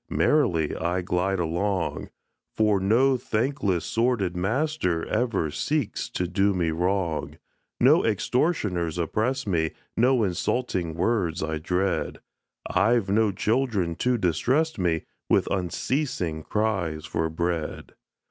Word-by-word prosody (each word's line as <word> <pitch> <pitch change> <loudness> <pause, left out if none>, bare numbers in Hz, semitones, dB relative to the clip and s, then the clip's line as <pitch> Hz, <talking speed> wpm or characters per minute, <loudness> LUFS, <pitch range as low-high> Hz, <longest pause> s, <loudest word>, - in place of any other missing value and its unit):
Merrily 85 - +2
I 90 +1 -1
glide 90 +2 0
along, 85 +2 -1 0.5
For 105 -2 +3
no 125 +7 +3
thankless, 110 - -1
sordid 115 -6 0
master, 95 - 0
Ever 110 -9 0
seeks 140 - -2
to 90 - -2
do 95 +3 +1
me 85 -3 +1
wrong: 90 -1 -1 0.4
No - - +5
extortioners 95 - 0
oppress 110 - -1
me, 80 -5 0 0.2
No 125 0 +3
insulting 90 -2 -1
words 90 -3 0
I 80 0 -2
dread 90 +4 -1 0.5
I've 115 -3 +2
no 110 0 +3
children 105 -4 0
to 125 -1 +1
distress 130 - +1
me 85 -3 0 0.3
With - - +4
unceasing 90 - -1
cries 95 -8 -1
for 80 0 -1
bread. 85 -1 -3
95 Hz, 115 wpm, -25 LUFS, 85-115 Hz, 0.5 s, No